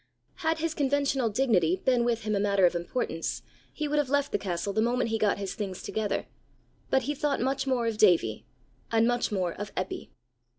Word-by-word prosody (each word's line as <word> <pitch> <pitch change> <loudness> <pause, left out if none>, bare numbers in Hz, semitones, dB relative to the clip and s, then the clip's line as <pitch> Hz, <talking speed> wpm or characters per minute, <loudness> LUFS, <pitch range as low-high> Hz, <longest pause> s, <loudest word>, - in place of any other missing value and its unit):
Had 320 0 0
his 320 0 -1
conventional 275 -4 +1
dignity 205 -8 +2
been 245 +5 +1
with 235 -2 0
him 215 0 0
a - - +1
matter 200 -2 +3
of 175 - +3
importance, 170 -1 -3 0.3
he 305 - -3
would 295 +1 +1
have 285 -3 0
left 285 0 +1
the - - 0
castle 185 +1 -2
the 220 - +2
moment 240 0 +1
he 225 - 0
got 210 -2 +2
his 195 -2 -4
things 195 -3 -5
together; 215 -2 -2 0.6
but 265 - +3
he 290 +4 -1
thought 290 -1 -1
much 270 +2 -1
more 250 -3 +1
of 225 -2 -2
Davie, 170 - +3 0.4
and 225 0 +4
much 240 -2 0
more 185 -4 0
of 205 0 -6
Eppy. 185 +1 -4
225 Hz, 205 wpm, -28 LUFS, 200-270 Hz, 0.6 s, and